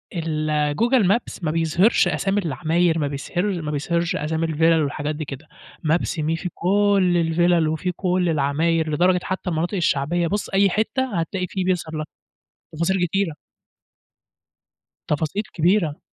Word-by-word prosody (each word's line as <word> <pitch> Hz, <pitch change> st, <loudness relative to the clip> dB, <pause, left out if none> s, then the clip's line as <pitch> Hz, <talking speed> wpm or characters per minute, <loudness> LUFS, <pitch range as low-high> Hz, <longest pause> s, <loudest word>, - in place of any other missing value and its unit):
الgoogle 155 Hz, -, +1 dB
maps 230 Hz, -4 st, -2 dB
ما 155 Hz, -, 0 dB
بيظهرش 165 Hz, +6 st, +3 dB
أسامي 200 Hz, +1 st, 0 dB
العماير، 165 Hz, +3 st, +1 dB
ما 145 Hz, -, 0 dB
بيظهرش 175 Hz, +8 st, -2 dB
ما 155 Hz, -3 st, -4 dB
بيظهرش 170 Hz, +3 st, -1 dB
أسامي 160 Hz, +2 st, -1 dB
الفيلل 160 Hz, 0 st, +3 dB
والحاجات 150 Hz, +1 st, -3 dB
دي 155 Hz, +1 st, -5 dB
كده. 140 Hz, +2 st, -9 dB, 0.4 s
maps 170 Hz, +2 st, 0 dB
me 155 Hz, +1 st, 0 dB
في 180 Hz, -, -2 dB
كُلّ 195 Hz, -1 st, +2 dB
الفيلل 170 Hz, 0 st, +2 dB
وفي 160 Hz, +4 st, -1 dB
كُلّ 180 Hz, 0 st, 0 dB
العماير 160 Hz, +2 st, +1 dB
لدرجة 180 Hz, +4 st, +3 dB
حتى 190 Hz, -1 st, -3 dB
المناطق 170 Hz, +4 st, -1 dB
الشعبية 170 Hz, 0 st, +1 dB
بُص 205 Hz, +4 st, -2 dB
أي 195 Hz, +1 st, +3 dB
حتة 220 Hz, +1 st, -1 dB
هتلاقي 180 Hz, +2 st, -2 dB
في 190 Hz, -, -2 dB
بيظهر 175 Hz, -4 st, -1 dB
لك 155 Hz, 0 st, -4 dB, 0.7 s
تفاصيل 175 Hz, +3 st, +1 dB
كتيرة. 185 Hz, -2 st, -1 dB, 1.7 s
تفاصيل 160 Hz, +7 st, -1 dB
كبيرة. 170 Hz, -2 st, +1 dB
170 Hz, 140 wpm, -22 LUFS, 155-185 Hz, 1.7 s, بيظهرش